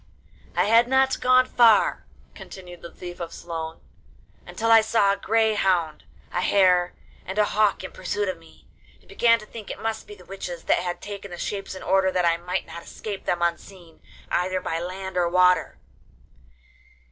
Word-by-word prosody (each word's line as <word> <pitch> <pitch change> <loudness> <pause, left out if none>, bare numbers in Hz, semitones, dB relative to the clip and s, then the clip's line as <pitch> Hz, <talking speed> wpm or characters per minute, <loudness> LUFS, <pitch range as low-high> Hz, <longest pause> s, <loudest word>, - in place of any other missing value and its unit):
'I - - +3
had 230 +3 +5
not 265 +1 +2
gone 255 0 +5
far,' 235 -4 +3 0.3
continued 180 -2 -11
the 170 - -9
Thief 175 -1 -9
of 170 -1 -5
Sloan, 165 -1 -6 0.7
'until 230 0 -1
I 225 0 +8
saw 215 -2 +2
a - - -1
grey 220 +1 +1
hound, 180 -6 0 0.3
a 180 - -1
hare, 180 -2 +3 0.3
and 190 +2 -7
a 210 - +4
hawk 210 -2 +1
in 190 - -7
pursuit 205 +2 -3
of 185 -3 -4
me, 165 0 -20 0.3
and - - -27
began 230 -1 +3
to 215 - -12
think 215 -1 -10
it - - -6
must 220 0 -4
be 415 - -10
the - - -17
witches 180 -3 -7
that - - +2
had 175 0 -4
taken 200 -1 -7
the 175 - -8
shapes 195 +1 -5
in 185 - -9
order 190 0 +2
that 180 -1 +1
I 165 0 +3
might 180 +2 -3
not 170 - -9
escape 200 +3 -8
them 175 -1 0
unseen 170 0 -5 0.3
either 185 +1 0
by 165 -2 -3
land 185 +1 -6
or 175 -1 +2
water. 180 +1 +3
190 Hz, 185 wpm, -24 LUFS, 175-215 Hz, 0.7 s, I